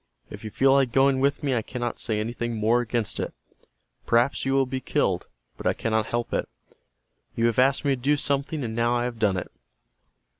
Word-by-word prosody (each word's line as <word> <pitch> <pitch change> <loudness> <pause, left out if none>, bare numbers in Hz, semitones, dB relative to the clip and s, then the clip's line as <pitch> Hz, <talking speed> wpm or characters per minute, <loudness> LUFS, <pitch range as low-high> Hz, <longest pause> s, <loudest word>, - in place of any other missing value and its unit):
If - - -9
you 110 - -5
feel 135 +5 +3
like 135 -3 +3
going 135 +1 +3
with 140 +3 +1
me 140 -2 +1
I 120 - +1
cannot 120 +1 -4
say 110 -3 -1
anything 120 +1 -3
more 110 +3 +2
against 120 -2 -1
it. - - -4 0.7
Perhaps 120 +4 +2
you 135 - +1
will 135 0 +3
be 130 +1 -3
killed, - - 0 0.3
but - - -3
I - - +3
cannot 110 -1 -1
help 120 0 -2
it. - - -1 0.9
You 115 - +1
have 115 0 +2
asked 135 +3 +3
me 140 - +3
to 130 -2 -1
do 145 +3 +2
something, 145 +1 -1
and 110 -2 -4
now 120 +1 +2
I 120 - 0
have 120 -2 -4
done 100 -4 +2
it." 90 - -5
120 Hz, 215 wpm, -25 LUFS, 115-135 Hz, 0.9 s, feel